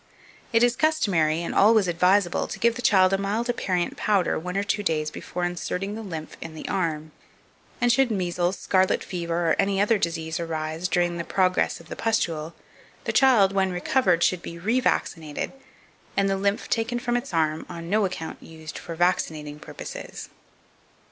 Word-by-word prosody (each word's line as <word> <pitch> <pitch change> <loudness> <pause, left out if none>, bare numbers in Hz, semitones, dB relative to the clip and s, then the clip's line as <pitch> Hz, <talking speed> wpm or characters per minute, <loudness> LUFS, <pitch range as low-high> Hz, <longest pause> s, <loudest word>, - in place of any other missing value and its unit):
It 230 +1 +4
is 245 0 +3
customary, 180 - +2
and - - -3
always 215 -1 +5
advisable, 180 +2 +2
to - - -6
give 235 0 +3
the 245 - -6
child 190 -5 +4
a 195 - +2
mild 215 +5 -1
aperient 185 -7 -1
powder 200 -4 +1
one 180 +3 -4
or 200 - +1
two 205 +1 -1
days 155 -5 0
before 180 - -5
inserting 180 +3 -2
the 220 - -5
lymph 165 -7 -7
in 160 - -7
the - - -7
arm; 160 -5 -2 0.7
and 245 0 +3
should 265 +1 +3
measles, 180 -3 -1
scarlet 190 -1 +2
fever, 170 -2 -1
or - - +4
any 195 0 +2
other 210 +1 +3
disease 165 -1 -2
arise 160 +1 -3
during 175 -2 +1
the 170 - -2
progress 185 +1 +1
of 170 - -15
the - - -6
pustule, 170 -8 -1 0.5
the - - -2
child, 235 -8 +5
when 190 -1 +1
recovered, 180 -1 +2
should 180 -2 +2
be 170 - -8
re 220 +9 +1
vaccinated, 160 - -1 0.7
and 195 0 +3
the 195 - +1
lymph 200 +2 0
taken 230 +1 0
from 240 0 -1
its 245 0 -2
arm 160 -2 0
on 170 -1 -7
no 210 +4 +2
account 180 -4 -4
used 160 -1 -9
for 165 - -7
vaccinating 155 -4 0
purposes. - - -8
185 Hz, 180 wpm, -25 LUFS, 165-205 Hz, 0.7 s, always